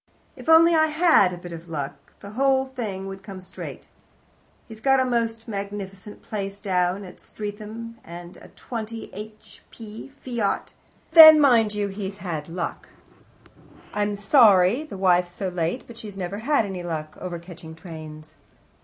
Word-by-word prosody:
"If - - -8
only 330 +1 +7
I 315 -1 +4
had 310 - +4
a 180 - -6
bit 175 0 -10
of 170 0 -9
luck, 140 -3 -6
the 200 - -9
whole 265 +3 +2
thing 220 -8 -5
would 195 0 -7
come 195 -1 -9
straight.... 185 - -9 0.8
He's 220 -1 -11
got 270 +3 +3
a 260 - +2
most 230 -2 -1
magnificent 200 -1 -6
place 200 -1 -5
down 185 -1 0
at 185 - -12
Streatham 215 +2 -8
and 175 +1 -10
a - - -14
20 225 -1 -7
h. 215 +2 -11
p. 220 -1 -10
Fiat, 245 -6 -3 0.4
but - - -21
then, 315 -1 +12
mind 230 -7 +4
you, 205 -1 -1
he's 195 0 -6
had 170 -5 -5
luck.... 170 0 -5 1.0
I'm 205 0 0
sorry 205 0 +5
the 250 - -9
wife's 180 -2 +3
so 190 +1 -3
late, 175 +6 -2
but 235 -1 -12
she 215 - -7
never 190 +1 -4
has 260 0 +2
any 190 -3 -5
luck 155 -3 -5
over 180 -2 -4
catching 170 -2 -11
trains." 155 -2 -10
200 Hz, 160 wpm, -24 LUFS, 180-230 Hz, 1.0 s, then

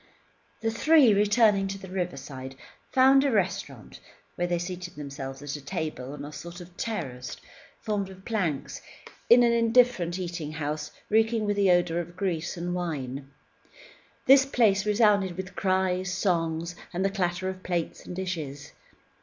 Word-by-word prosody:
The 225 0 0
three, 275 0 +5
returning 205 -1 +4
to 195 0 -4
the 190 -1 -10
riverside, 135 -8 -5 0.4
found 265 +1 +6
a 280 - +2
restaurant, 185 - -2 0.3
where 175 - -1
they 175 0 0
seated 175 0 -6
themselves 140 -2 -7
at 145 -2 -9
table 140 -4 -4
on 145 - -7
a 150 - -9
sort 170 +3 -8
of 175 0 -12
terrace 135 - -4 0.4
formed 205 -3 -2
of 190 0 -13
planks 185 - -2 0.5
in 240 +1 +8
an 235 - +4
indifferent 230 -6 +3
eating 170 -4 -4
house 155 -1 -3 0.2
reeking 225 0 +3
with 205 0 0
the 200 -1 +3
odour 175 -1 +3
of 175 0 -6
grease 175 -3 -2
and 175 +1 -3
wine. 140 -6 -4 1.0
This 270 0 +8
place 215 -7 +2
resounded 205 -4 +3
with 190 0 -6
cries, 185 -1 0
songs, 170 -3 -1 0.2
and 185 +2 -1
the 195 - +1
clatter 180 -1 -1
of 190 0 -5
plates 175 -3 -3
and 180 - -8
dishes. 155 -7 -5
180 Hz, 155 wpm, -27 LUFS, 165-205 Hz, 1.0 s, in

